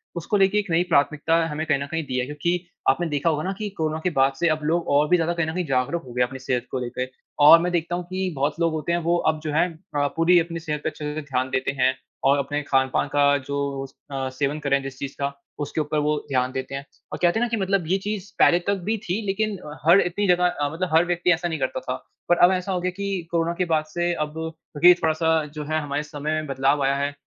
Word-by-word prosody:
उसको 170 +5 -1
लेके 195 +1 +3
एक 205 -2 -4
नई 165 +2 +3
प्राथमिकता 155 0 +2
हमें 155 0 -3
कहीं 145 -3 +1
न 140 - -3
कहीं 165 +2 -3
दी 130 -2 -3
है। 125 - -1
क्योंकि 150 +5 -1 0.3
आपने 175 - +2
देखा 145 +2 +1
होगा 155 -1 -1
ना 190 - -1
कि 210 -1 -3
कोरोना 155 0 -1
के 180 - +2
बाद 135 -4 +2
से 170 - +2
अब 155 -1 -1
लोग 165 +3 0
और 145 +1 +3
भी 180 - +5
ज़्यादा 170 0 0
कहीं 170 -2 -1
न 160 - -3
कहीं 180 0 -2
जागरूक 135 +5 0
हो 125 - -11
गए 125 - 0
हैं 125 - +4
अपनी 130 +1 -9
सेहत 125 -2 -2
को 130 - -1
लेके। 125 +1 -3 0.4
और 165 +3 +10
मैं 180 +1 -1
देखता 175 0 -1
हूँ 180 - -3
कि 185 0 -2
बहुत 145 +3 -1
लोग 165 -1 +2
होते 155 +1 -2
हैं 170 - +2
वो 170 +1 +1
अब 155 - -8
जो 155 - -2
है 160 +4 +3 0.3
अ, 145 0 +2
पूरी 170 +2 +5
अपनी 170 0 -3
सेहत 150 -2 -4
पे - - 0
अच्छे 150 -1 -5
से 155 - -3
ध्यान 130 -3 -2
देते 130 +1 -1
हैं 130 +1 +3 0.3
और 140 +1 +5
अपने 145 +1 -2
खान-पान 135 0 +1
का 145 0 +4
जो 140 -1 -2 0.3
अ, 135 -1 -2
सेवन 140 +3 -2
करे 140 -2 +1
जिस 135 -1 -7
चीज़ 140 -1 -5
का 140 0 -1 0.3
उसके 150 +2 -2
ऊपर 150 0 -2
वो 150 +1 +1
ध्यान 130 -1 +1
देते 130 +1 -5
हैं 140 0 -6 0.3
और - - -4
कहते 175 +4 +3
हैं - - +1
ना - - -2
कि 230 - -1
मतलब 190 -3 0
ये 185 +3 +2
चीज़ 205 -1 -4
पहले 175 - +6
तक 200 - +3
भी 225 - +1
थी 185 +5 -2
लेकिन 210 +1 -1
अ, 150 -4 -10
हर 175 +4 +7
इतनी 190 +3 -1
जगह 180 0 +3 0.2
मतलब 180 +2 -2
हर 165 +2 +5
व्यक्ति 175 0 +1
ऐसा 175 +1 -2
नहीं 160 -2 -3
करता 130 0 -1
था 130 0 -5 0.3
पर 175 - +5
अब 180 - +4
ऐसा 185 +1 -1
हो 185 - 0
गया 185 +1 -1
कि 195 -3 -3
कोरोना 170 0 +1
के 180 - +1
बाद 160 -2 +1
से 175 +2 -1
अब 150 -2 -3
क्योंकि 160 +1 +3
थोड़ा-सा 160 0 +1 0.2
जो 150 -1 -5
है 155 +1 0
हमारे 145 0 -2
समय 150 0 -4
में 155 - -8
बदलाव 135 +1 +1
आया 135 +1 +2
है 140 +1 -1
155 Hz, 270 wpm, -24 LUFS, 140-175 Hz, 0.4 s, और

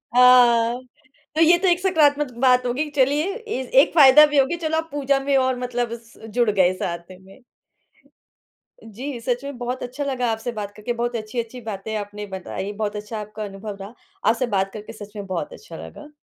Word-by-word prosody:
हाँ। 245 -1 +6 0.6
तो 325 - +2
ये 340 +2 +6
तो 375 +1 0
एक 350 0 +3
सकारात्मक 295 -7 +2
बात 250 -1 +4
होगी, 285 +5 -1
चलिए 290 +7 +1
ए 445 - -4 0.2
एक - - 0
फ़ायदा 295 0 +9
भी 295 -1 -1
होगया 275 +5 +3
चलो 320 +1 0
आप 325 0 -3
पूजा 280 -1 +1
में 275 0 0
और 260 -1 +1
मतलब 245 -1 -2
स 230 - -20 0.2
जुड़ 240 -3 +3
गए 185 -2 +3
साथ 170 0 -5
में। 195 +6 -17 1.4
जी, 240 +4 -7
सच 245 +2 -2
में 280 -3 -6
बहुत 250 +1 -4
अच्छा 255 +4 -5
लगा 255 -3 -1
आपसे 225 +2 -3
बात 205 -2 -5
करके, 220 +3 -3
बहुत 240 0 -2
अच्छी-अच्छी 230 +2 -5
बातें 220 0 -5
आपने 205 0 -6
बताई, 190 +1 -5
बहुत 210 0 -3
अच्छा 210 +1 -5
आपका 210 +1 -7
अनुभव 200 +1 -7
रहा। 200 +4 -9 0.4
आपसे 235 +2 +1
बात 195 0 0
करके 215 +1 -8
सच 210 0 -11
में 200 -1 -6
बहुत 190 - -4
अच्छा - - -11
लगा। 295 - -12
245 Hz, 190 wpm, -22 LUFS, 210-280 Hz, 1.4 s, फ़ायदा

